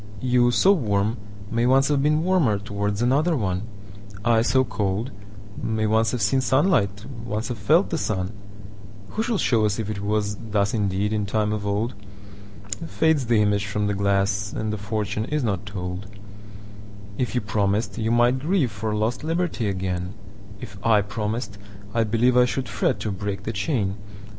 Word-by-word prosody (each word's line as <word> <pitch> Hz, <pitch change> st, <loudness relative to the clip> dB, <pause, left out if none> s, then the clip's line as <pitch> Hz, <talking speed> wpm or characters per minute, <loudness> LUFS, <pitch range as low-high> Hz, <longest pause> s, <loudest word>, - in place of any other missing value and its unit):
You, 125 Hz, 0 st, +3 dB
so 185 Hz, +10 st, +5 dB
warm, 110 Hz, -, +1 dB, 0.3 s
may 115 Hz, +1 st, +2 dB
once 135 Hz, +2 st, +4 dB
have 145 Hz, -2 st, +2 dB
beenWarmer 150 Hz, -, +2 dB
towards 105 Hz, +1 st, -2 dB
another 150 Hz, +6 st, +2 dB
one:I, 100 Hz, +2 st, -2 dB
so 130 Hz, +3 st, +3 dB
cold, 105 Hz, +1 st, -2 dB, 0.5 s
may 110 Hz, -1 st, 0 dB
once 110 Hz, +1 st, +3 dB
have 125 Hz, -, -2 dB
seenSunlight, 130 Hz, -, +2 dB, 0.2 s
once 110 Hz, +1 st, -3 dB
have 120 Hz, -3 st, -4 dB
felt 160 Hz, -, +3 dB
the 165 Hz, -, 0 dB
sun:Who 100 Hz, -, -6 dB
shall 230 Hz, -1 st, 0 dB
show 115 Hz, -, +2 dB
us 105 Hz, -1 st, +1 dB
if 110 Hz, -2 st, -3 dB
it 105 Hz, -, -4 dB
wasThus 105 Hz, 0 st, -1 dB
indeed 100 Hz, -1 st, 0 dB
in 105 Hz, -2 st, -1 dB
time 105 Hz, +1 st, 0 dB
of 105 Hz, -1 st, -3 dB
old? 105 Hz, +4 st, -1 dB, 0.9 s
Fades 160 Hz, -6 st, +2 dB
the 115 Hz, -3 st, +4 dB
image 105 Hz, 0 st, +1 dB
from 105 Hz, +1 st, -1 dB
the 100 Hz, -, 0 dB
glass, 100 Hz, +1 st, +1 dB
And 110 Hz, -1 st, -3 dB
the -, -, -2 dB
fortune 105 Hz, +1 st, -2 dB
is 150 Hz, +2 st, -1 dB
not 100 Hz, -3 st, -2 dB
told. 90 Hz, -1 st, -5 dB, 1.1 s
If 125 Hz, 0 st, -1 dB
you 125 Hz, -, +2 dB
promised, 105 Hz, 0 st, 0 dB
you 110 Hz, 0 st, 0 dB
might 120 Hz, +2 st, +3 dB
grieveFor 120 Hz, -, 0 dB
lost 115 Hz, +5 st, -1 dB
liberty 165 Hz, -7 st, -1 dB
again:If 100 Hz, +2 st, -6 dB
I 110 Hz, -3 st, +4 dB
promised, 105 Hz, 0 st, -4 dB, 0.3 s
I 115 Hz, -1 st, +2 dB
believeI 125 Hz, +3 st, +4 dB
should 130 Hz, +1 st, -2 dB
fret 120 Hz, -6 st, 0 dB
to 105 Hz, -, -2 dB
break 100 Hz, +1 st, -4 dB
the 110 Hz, -, -3 dB
chain. 105 Hz, -2 st, -1 dB
105 Hz, 155 wpm, -24 LUFS, 100-120 Hz, 1.1 s, so